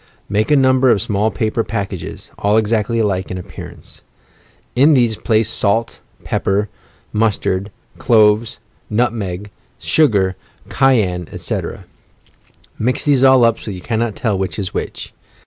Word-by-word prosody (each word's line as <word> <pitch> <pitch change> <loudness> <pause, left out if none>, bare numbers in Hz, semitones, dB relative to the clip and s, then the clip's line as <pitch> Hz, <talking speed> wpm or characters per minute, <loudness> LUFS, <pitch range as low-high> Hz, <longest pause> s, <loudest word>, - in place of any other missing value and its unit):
Make 105 +2 0
a 150 - +5
number 130 -1 +4
of 110 - +4
small 105 0 0
paper 110 +1 -1
packages, 100 -6 -5
all 105 +2 +2
exactly 110 +1 +1
alike 100 -4 0
in 90 - -4
appearance. 90 - -10 0.7
In 145 +4 +5
these 120 -4 +2
place 110 0 +1
salt, 110 +1 0 0.2
pepper, 100 +1 -1 0.4
mus 110 -1 +2
tard, 95 +2 -2 0.3
cloves, 110 -1 +3 0.3
nutmeg, 105 -4 -2 0.3
sugar, 100 -11 +2 0.3
cayenne, 105 - +2
etc. - - -5 0.9
Mix 125 +3 -1
these 140 -3 +3
all 130 -2 +6
up 115 -1 +2
so - - -12
that 105 - -4
you 90 - -8
cannot 115 0 -2
tell 110 -4 -1
which 95 -4 -3
is 95 -3 -4
which. - - -5
110 Hz, 140 wpm, -18 LUFS, 100-120 Hz, 0.9 s, all